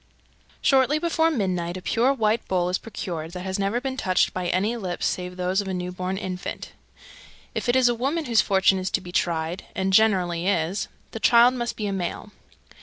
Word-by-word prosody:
_ - - -34 0.6
308. - - -9
Shortly 270 +2 +4
before 325 0 +2
midnight 185 - -1
a - - -7
pure 240 +4 +2
white 225 -4 0
bowl 180 -1 +1
is 180 - 0
procured, 170 -7 -6
that 180 - -5
has 190 +1 -2
never 200 +4 0
been 260 0 -4
touched 185 -6 +1
by 180 -1 -2
any 200 +7 0
lips 185 -6 -3
save 180 0 -2
those 185 +2 0
of 200 - -7
a 190 - -2
new 180 0 -4
born 185 +1 -3
infant. 185 -2 -5 0.8
If - - -2
it 240 - +3
is 260 -1 +5
a 240 - +3
woman 280 +7 -1
whose 230 -4 +4
fortune 190 -1 +3
is 185 +1 -2
to - - 0
be 180 -1 -10
tried 170 0 -1
(and 190 0 0
it - - +6
generally 185 -5 +3
is) 185 0 0 0.2
the 225 - -6
child 240 +2 +6
must 240 -2 -3
be 215 - -3
a 200 - -1
male. 190 +2 -4
190 Hz, 220 wpm, -24 LUFS, 180-235 Hz, 0.8 s, it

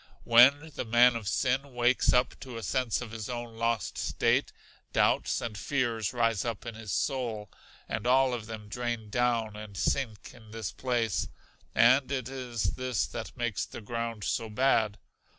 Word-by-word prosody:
When 140 +7 +6
the - - -3
man 120 +1 +5
of 110 -3 -4
sin 130 +4 0
wakes 120 +1 +3
up 125 0 +3
to 125 -3 -8
a 115 - -6
sense 125 -2 0
of 120 -3 -7
his 110 -1 -6
own 120 -2 -5
lost 115 -3 -1
state, - - +1 0.4
doubts - - +2
and 110 -3 -4
fears 115 -2 -1
rise 115 -4 +1
up 115 -3 -4
in 120 - -5
his 110 -2 -7
soul, 115 -7 -2 0.4
and 110 +2 -3
all 130 0 +4
of 115 -3 -5
them 110 -2 -7
drain 120 -1 -4
down 115 -3 +1
and 105 -2 -9
sink 110 +3 -1
in 110 -2 -16
this 110 -3 -5
place: 120 - -1 0.5
and 130 +3 +5
it 130 -3 -2
is 120 -7 -2
this 130 -3 -1
that - - -7
makes 120 -4 -1
the - - -8
ground 115 -1 -4
so 115 +2 -1
bad. 110 -3 +2
115 Hz, 170 wpm, -29 LUFS, 110-125 Hz, 0.5 s, When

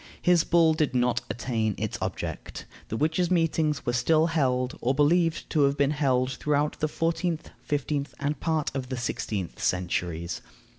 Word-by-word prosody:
His 175 -2 +4
bull 165 -2 +4
did 155 -4 0
not 125 0 +2
attain 110 -1 -1
its - - -3
object. - - -5 0.2
The 110 - -3
witches' 160 +5 +1
meetings 165 -4 +1
were 120 - 0
still 155 +6 +3
held, 130 -6 0
or 130 +3 +1
believed 165 +3 +2
to 155 - +2
have 140 +1 +1
been 140 0 +3
held 130 -4 +1
throughout 150 +1 0
the 155 - +1
fourteenth, 165 +1 -1
fifteenth, 145 0 -2
and 145 +1 -1
part 160 -3 0
of 130 -2 -3
the 130 - -3
sixteenth 105 -6 -3
centuries. 90 -2 -1
145 Hz, 160 wpm, -27 LUFS, 125-160 Hz, 0.2 s, His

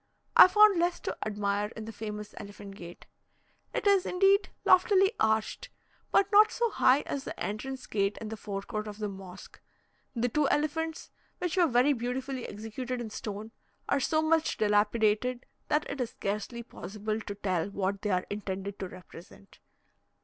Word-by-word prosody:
I - - +11
found 420 -1 +6
less 345 +1 +1
to - - -3
admire 205 -1 -1
in 220 - -7
the 225 - -6
famous 210 -1 -7
Elephant 200 -1 -9
gate. 175 -3 -11 0.7
It - - -3
is, 400 -2 +5
indeed, 390 +2 +3 0.2
loftily 385 +1 +5
arched, 220 0 0 0.4
but 400 +1 +3
not 425 +1 +7
so 470 -2 0
high 265 -5 +4
as 275 - -4
the - - -7
entrance 260 +5 -4
gate 200 -1 -1
in 220 - -6
the 220 - -4
fore 200 -2 -5
court 215 -1 -4
of 205 -1 -7
the 215 -1 -2
mosque; 190 -2 -11 0.5
the 240 +1 +1
two 285 +4 +1
elephants, 320 +2 -1 0.3
which 360 -1 -2
were 355 -3 +4
very 255 +2 +4
beautifully 255 +1 -3
executed 230 +4 -5
in 230 -3 -6
stone, 210 +1 -6 0.4
are 280 - +2
so 310 +3 +1
much 320 0 +2
dilapidated, 215 +3 +2 0.2
that 300 +1 +1
it 280 - -4
is 240 - -1
scarcely 215 +4 -4
possible 215 0 -5
to 205 - -6
tell 185 -3 -1
what 200 0 -2
they 210 - -2
are 185 -2 +1
intended 200 -1 -4
to 190 - -3
represent. 180 +1 -14
220 Hz, 170 wpm, -29 LUFS, 205-290 Hz, 0.7 s, I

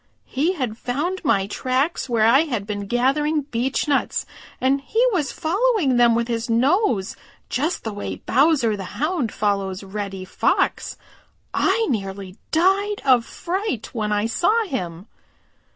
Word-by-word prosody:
He 310 +8 0
had 250 - -4
found 310 +10 -2
my 195 -1 +2
tracks 260 - -1
where 225 -2 +3
I 235 +4 +6
had 235 -10 -3
been 205 -1 -4
gathering 280 +6 +1
beechnuts, 265 +4 0 0.3
and 270 +2 +2
he 445 - +1
was 320 -9 0
following 370 - +1
them 240 -1 +5
with 235 0 0
his 230 -1 -2
nose 240 - +2 0.3
just 300 +8 -1
the 220 - -4
way 95 - -5
Bowser 260 - +2
the 195 -2 -8
Hound 305 - 0
follows 200 -2 -1
Reddy 195 -1 -5
Fox. - - 0 0.6
I 455 - +2
nearly 195 -5 -4
died 390 +5 +2
of 250 -3 +4
fright 360 - -3
when 215 -3 -2
I 210 0 +1
saw 415 - +2
him." 180 - -5
250 Hz, 140 wpm, -22 LUFS, 210-315 Hz, 0.6 s, I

